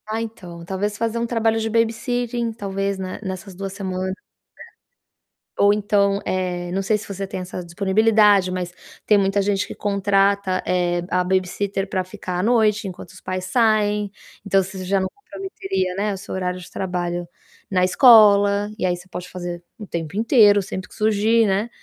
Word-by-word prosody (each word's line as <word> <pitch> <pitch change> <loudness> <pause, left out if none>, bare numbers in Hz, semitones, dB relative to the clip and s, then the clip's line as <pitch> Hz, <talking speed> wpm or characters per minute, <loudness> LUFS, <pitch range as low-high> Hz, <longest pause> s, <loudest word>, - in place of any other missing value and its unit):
Ah, 220 +1 -2
então, 180 -7 -8
talvez 205 +3 -2
fazer 230 +1 -1
um 235 - 0
trabalho 225 -1 +1
de 225 0 -2
babysitting, 230 +1 0
talvez 195 -2 -3
na 185 -1 -5
nessas 190 0 -6
2 195 +1 -5
semanas. 190 -1 -3 1.3
É. - - -8
Ou 200 0 +6
então, 200 -1 +1
eh, 180 -1 -2
não 195 +2 -1
sei 210 +2 +2
se - - -10
você 195 0 -4
tem 190 - -6
essa 180 0 -6
disponibilidade, 200 +1 +3
mas 180 -1 -3 0.4
tem 210 - +5
muita 195 0 +2
gente 200 0 0
que - - -8
contrata, 200 -1 +1
eh, 175 -1 +1
a 180 +1 +1
babysitter 190 +2 -1
pra 185 -1 -1
ficar 180 0 -6
à - - 0
noite, 215 -2 +2
enquanto 180 -1 -9
os 185 +1 -15
pais 185 0 -4
saem. 210 -1 +2 0.3
Então 195 -1 +3
você 190 0 -6
já 195 +1 +1
não 190 - -1
comprometeria, 195 - -4
né, 205 +1 -1
o - - -5
seu 190 - -7
horário 180 -1 -2
de 175 - -11
trabalho 175 -2 -3 0.4
na 185 -1 +2
escola 205 -1 +6
e - - -1
aí 180 -1 +1
você 180 +1 -13
pode 180 0 -7
fazer 175 -1 -6 0.2
o 210 - -8
tempo 165 0 -5
inteiro, 215 -2 +5
sempre 185 0 -6
que - - -16
surgir, 220 +1 +3
né, 200 +4 0
195 Hz, 180 wpm, -22 LUFS, 185-210 Hz, 1.3 s, Ou